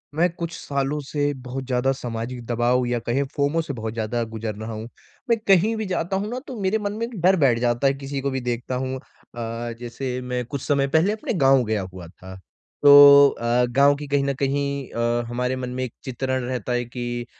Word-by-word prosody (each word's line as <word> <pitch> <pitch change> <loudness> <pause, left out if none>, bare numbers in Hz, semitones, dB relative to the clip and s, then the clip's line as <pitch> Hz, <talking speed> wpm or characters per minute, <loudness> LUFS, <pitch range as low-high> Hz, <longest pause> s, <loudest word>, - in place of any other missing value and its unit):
मैं 175 +3 +3
कुछ 170 -1 -5
सालों 140 +1 -2
से 145 -1 0
बहुत 130 +1 -5
ज़्यादा 125 +1 +1
सामाजिक 120 0 -5
दबाव 120 +2 +1
या 120 0 0
कहें 120 +4 -1
फ़ोमो 145 +3 +1
से 145 -3 -5
बहुत 110 -2 -5
ज़्यादा 115 +1 -2
गुज़र 110 -1 -4
रहा 110 +2 -6
हूँ। 110 +1 -6 0.4
मैं 230 - +4
कहीं 200 +3 +4
भी 220 -1 -3
जाता 185 -1 -2
हूँ 205 +2 -3
ना 245 +2 -4
तो 255 -5 -7
मेरे 195 +3 +1
मन 205 -1 -3
में 225 +2 -2
एक 235 0 -9
डर 185 +3 +5
बैठ 125 -5 +3
जाता 120 +2 +1
है 135 - +3
किसी 135 0 -5
को 140 - -1
भी 130 0 -2
देखता 125 +1 -3
हूँ। 130 +1 -2
अ, 115 -2 -7
जैसे 125 +1 -4
मैं 125 0 -3
कुछ 140 +2 -5
समय 140 -2 +1
पहले 160 +7 +3
अपने 220 +2 -3
गाँव 135 - +4
गया 110 -1 -1
हुआ 90 -2 -9
था। 95 +2 -12 0.5
तो 145 - +8 0.4
अ, 120 0 +1
गाँव 140 +3 +4
की 145 +1 -7
कहीं 140 0 +1
न 140 0 0
कहीं 140 -1 -1
अ, 120 0 0
हमारे 125 +2 -1
मन 125 -1 -4
में 130 +1 -3
एक 125 - -5
चित्रण 130 0 -2
रहता 125 -1 -3
है 120 0 0
कि 120 0 -5
130 Hz, 220 wpm, -23 LUFS, 120-145 Hz, 0.5 s, तो